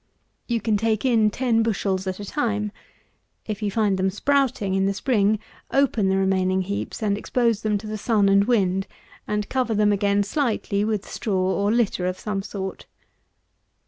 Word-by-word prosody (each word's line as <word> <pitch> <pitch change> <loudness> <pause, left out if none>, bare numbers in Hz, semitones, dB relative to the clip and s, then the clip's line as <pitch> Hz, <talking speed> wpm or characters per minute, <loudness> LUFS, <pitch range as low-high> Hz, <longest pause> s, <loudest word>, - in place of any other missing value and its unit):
You 235 -1 0
can 215 0 +1
take 220 +2 0
in 225 -4 +4
ten 230 0 +1
bushels 195 -4 -1
at 185 +1 -3
a 205 - -6
time. 210 -4 -1 0.7
If 215 -2 -5
you 210 - 0
find 200 -2 +1
them 190 +1 +2
sprouting 250 -2 +1
in 195 0 +2
the 195 - -1
spring, 215 -3 +2 0.3
open 245 -8 +2
the 190 - +2
remaining 190 -1 +1
heaps, 200 +3 -4
and 205 -2 +1
expose 230 0 0
them 215 -2 +1
to 210 - -9
the 215 0 -4
sun 210 -2 +2
and 200 0 +4
wind; 195 -5 +1 0.4
and 210 -1 -1
cover 250 -4 0
them 210 0 +3
again 200 0 +2
slightly 210 -4 -1
with 210 -2 -2
straw 210 -5 -2 0.2
or 200 +1 +1
litter 220 -6 +1
of 185 0 -2
some 205 -1 -3
sort. 190 -1 -6
210 Hz, 175 wpm, -23 LUFS, 195-225 Hz, 0.7 s, in